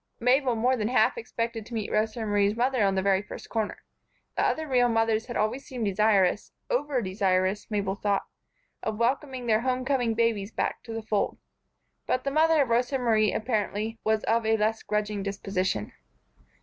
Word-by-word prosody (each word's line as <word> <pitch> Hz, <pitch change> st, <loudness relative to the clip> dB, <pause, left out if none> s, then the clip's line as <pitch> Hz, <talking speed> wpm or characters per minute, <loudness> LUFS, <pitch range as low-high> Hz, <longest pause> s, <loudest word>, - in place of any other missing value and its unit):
Mabel 250 Hz, +1 st, +3 dB
more 245 Hz, +3 st, +2 dB
than 215 Hz, -4 st, -1 dB
half 250 Hz, -, +3 dB
expected 230 Hz, -, -4 dB
to 235 Hz, -, -7 dB
meet 215 Hz, -2 st, -3 dB
Rosa 215 Hz, +2 st, 0 dB
Marie's 205 Hz, 0 st, +2 dB
mother 250 Hz, +1 st, +1 dB
at 195 Hz, -1 st, +3 dB
the 190 Hz, -, 0 dB
very 195 Hz, -1 st, +3 dB
first 210 Hz, -, -10 dB
corner. 220 Hz, -2 st, -3 dB, 0.5 s
The -, -, +1 dB
other 315 Hz, 0 st, 0 dB
real 250 Hz, -3 st, +3 dB
mothers 225 Hz, 0 st, +1 dB
had 240 Hz, -, -4 dB
always 215 Hz, +6 st, 0 dB
seemed 245 Hz, -4 st, -4 dB
desirous 200 Hz, -1 st, +2 dB, 0.2 s
over 290 Hz, -, 0 dB
desirous, 190 Hz, +1 st, 0 dB
Mabel 200 Hz, -3 st, -1 dB
thought 200 Hz, 0 st, -1 dB, 0.6 s
of 215 Hz, -1 st, -3 dB
welcoming 255 Hz, +2 st, -1 dB
their 220 Hz, -1 st, +3 dB
home 255 Hz, 0 st, -1 dB
coming 250 Hz, -5 st, +1 dB
babies 225 Hz, -3 st, 0 dB
back -, -, -2 dB
to 230 Hz, -, -8 dB
the 225 Hz, 0 st, -4 dB
fold; 210 Hz, -2 st, -1 dB, 0.7 s
but 255 Hz, -, 0 dB
the 275 Hz, -, -1 dB
mother 315 Hz, 0 st, +4 dB
of 260 Hz, -, -6 dB
Rosa 245 Hz, +3 st, +1 dB
Marie, 220 Hz, -4 st, +2 dB
apparently, 220 Hz, -1 st, -2 dB
was 220 Hz, 0 st, +1 dB
of 230 Hz, +1 st, +1 dB
a 220 Hz, 0 st, +2 dB
less 220 Hz, +1 st, 0 dB
grudging 210 Hz, -1 st, -2 dB
disposition. 190 Hz, -, -2 dB
225 Hz, 180 wpm, -27 LUFS, 205-250 Hz, 0.7 s, mother